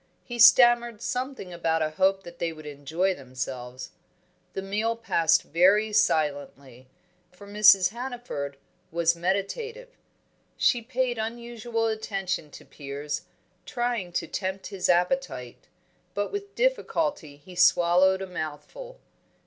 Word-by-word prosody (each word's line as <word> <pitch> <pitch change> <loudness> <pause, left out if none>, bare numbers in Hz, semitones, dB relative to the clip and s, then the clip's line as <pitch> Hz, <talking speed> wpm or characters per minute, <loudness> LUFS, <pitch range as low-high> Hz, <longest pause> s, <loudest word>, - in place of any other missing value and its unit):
He 240 -1 -7
stammered 240 -1 +6
something 250 -6 -4
about 165 -1 0
a 155 - -2
hope 190 +4 +1
that 175 0 -12
they 170 -1 -1
would 155 -1 -12
enjoy 150 +6 -1
themselves. 130 -3 -7 0.6
The 195 - -4
meal 215 +4 -1
passed 165 -8 +2
very 200 +6 +3
silently, 140 -7 0 0.4
for 180 +3 -14
Mrs. 200 -2 +6
Hannaford 235 - -6 0.3
was 170 0 +2
meditative. 320 - -3 0.7
She 240 - +3
paid 250 0 -2
unusual 235 0 -3
attention 195 -7 -3
to - - -13
Piers, 145 +1 -6 0.4
trying 240 -7 -2
to - - -1
tempt 190 0 -4
his 185 -2 -1
appetite; 180 - 0 0.5
but 205 0 -2
with 405 0 -6
difficulty 300 - -1
he 165 +6 -14
swallowed 180 +2 +4
a - - -6
mouthful. 185 - -7
190 Hz, 120 wpm, -26 LUFS, 160-235 Hz, 0.7 s, stammered